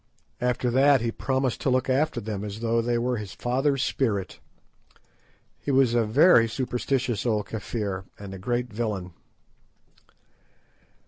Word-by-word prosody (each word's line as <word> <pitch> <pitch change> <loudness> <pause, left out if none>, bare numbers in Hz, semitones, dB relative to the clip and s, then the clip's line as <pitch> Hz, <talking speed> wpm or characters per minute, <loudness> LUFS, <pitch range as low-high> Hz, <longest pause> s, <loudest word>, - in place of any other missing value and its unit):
After 125 0 0
that 135 +1 +5
he 115 0 -1
promised 130 0 -1
to - - +1
look 130 0 +1
after 135 +1 +1
them 105 -2 -4
as 105 +1 -6
though 115 0 +1
they 120 +1 0
were 125 +1 0
his 105 -3 -7
father's 135 +2 0
spirit. 100 - -1 1.2
He - - -6
was 130 -3 +4
a 120 -2 +3
very 115 0 +5
superstitious 125 0 -1
old 110 -4 0
Kafir 100 -3 -4
and 100 -1 -8
a 95 - -8
great 120 +3 -2
villain. 105 -6 -3
120 Hz, 140 wpm, -26 LUFS, 105-130 Hz, 1.2 s, that